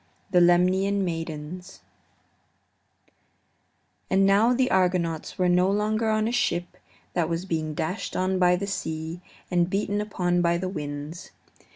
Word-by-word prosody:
THE 180 -2 +5
LEMNIAN 185 +3 +3
MAIDENS 165 +2 -6 2.3
And 195 +1 +3
now 205 +5 +4
the 255 +1 +1
Argonauts 180 -4 0
were 185 - +2
no 180 +1 +3
longer 215 +2 0
on 215 0 +1
a - - -1
ship 175 -7 -1 0.4
that 170 -3 0
was 170 +2 -2
being 155 -4 -2
dashed 180 +8 -3
on 185 0 0
by 180 -1 +5
the 190 +3 -3
sea 160 -3 -4 0.3
and 175 -1 +2
beaten 205 +1 -1
upon 175 -4 0
by 170 0 +2
the 185 +1 -3
winds. 150 0 -6
180 Hz, 140 wpm, -25 LUFS, 170-195 Hz, 2.3 s, THE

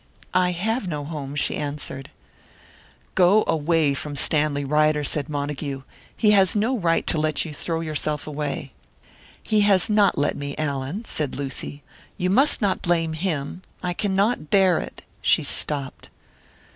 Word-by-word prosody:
"I 180 0 +3
have 215 +4 -2
no 150 -4 -4
home," 145 -3 -6
she 145 - 0
answered. 145 -2 -5 1.0
"Go 190 +4 +5
away 160 -2 +2
from 145 +1 -5
Stanley 145 0 +2
Ryder," 150 +1 +2
said 145 +1 -1
Montague. 145 -2 -4 0.3
"He 210 - +4
has 195 -2 +5
no 225 +5 +1
right 170 -7 +1
to 160 - +2
let 155 +1 0
you 155 - -7
throw 165 +2 -3
yourself 155 -2 -2
away." 145 -2 -4 0.7
"He 215 -1 +2
has 200 -1 +4
not 205 -2 +3
let 145 - +1
me, 140 0 -5
Allan," 145 - -3
said 150 -8 -2
Lucy. 140 +1 -5 0.3
"You 180 -1 0
must 265 +2 +3
not 195 -2 +1
blame 165 -2 +1
him 160 -1 -3 0.2
I 180 -1 -1
cannot 200 -2 0
bear 190 -4 +4
it." - - -8 0.2
She - - +3
stopped. 140 -3 -3
155 Hz, 150 wpm, -23 LUFS, 145-190 Hz, 1.0 s, Go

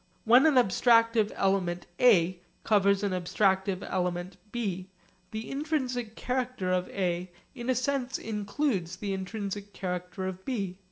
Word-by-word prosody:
When 245 +6 +7
an 305 - +3
abstractive 230 -1 +4
element 185 -3 0
A 185 -7 +5 0.2
covers 200 -1 +3
an 200 - 0
abstractive 190 +1 0
element 180 0 -2
B, 195 -6 -3 0.4
the 220 +1 -5
intrinsic 260 -6 -2
character 250 -7 -2
of 180 0 0
A 180 -1 -1 0.2
in 245 -2 -6
a 255 - +3
sense 260 0 -1
includes 210 - -2
the 200 +1 -3
intrinsic 200 +1 -5
character 180 0 -4
of 190 0 -5
B. 195 -7 -3
200 Hz, 130 wpm, -29 LUFS, 185-240 Hz, 0.4 s, When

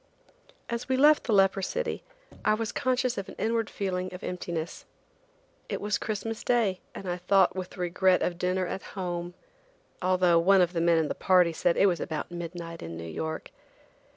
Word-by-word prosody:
As 235 +3 -4
we 260 - +2
left 300 +3 +5
the 235 - -1
leper 195 -1 +4
city - - -2 0.4
I 215 - +3
was 225 0 -3
conscious 255 -2 0
of 195 - -6
an - - -10
inward 225 0 0
feeling 185 -2 -3
of 180 - -10
emptiness. 170 -2 -4 0.8
It - - -2
was 210 0 -1
Christmas 220 +1 -4
day, 220 -7 +2 0.2
and 195 - -7
I 175 0 -1
thought 185 +1 +3
with 185 +1 -6
regret 180 +1 +2
of 175 -1 -2
dinner 185 +1 0
at 190 - -4 0.2
home, 175 -1 -3 0.7
although 180 -2 +4
one 190 +3 +5
of 175 0 +2
the 165 - 0
men 170 0 +4
in 160 -2 +2
the - - -2
party 180 -3 +3
said 170 +1 +1
it - - +5
was 175 -4 +2
about 155 +3 -4
midnight 170 -1 -6
in 85 0 -6
New 85 - -6
York. 160 - -5
185 Hz, 185 wpm, -28 LUFS, 175-205 Hz, 0.8 s, left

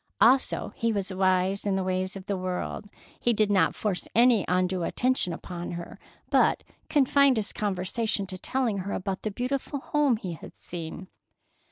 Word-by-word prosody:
Also, 260 +3 +3
he 230 0 0
was 200 -2 -2
wise 185 +1 +2
in 200 -2 0
the 190 - 0
ways 185 +1 -1
of 190 -1 -8
the 200 - -1
world, 185 +2 -4 0.3
he 240 - +2
did 215 -1 +2
not 185 -5 +3
force 200 -4 -2
any 235 -3 +5
undue 180 0 +1
attention 250 +1 0
upon 175 +1 -6
her, 170 0 -7 0.3
but - - +3 0.3
confined 280 -2 +4
his 210 -2 -1
conversation 205 +1 -1
to 185 -1 -6
telling 240 -5 0
her 195 +2 -4
about 190 0 -3
the 215 - -2
beautiful 260 +6 -3
home 285 -3 +2
he 185 -5 -5
had 160 - -11
seen. 170 +1 -7
200 Hz, 170 wpm, -27 LUFS, 185-235 Hz, 0.3 s, any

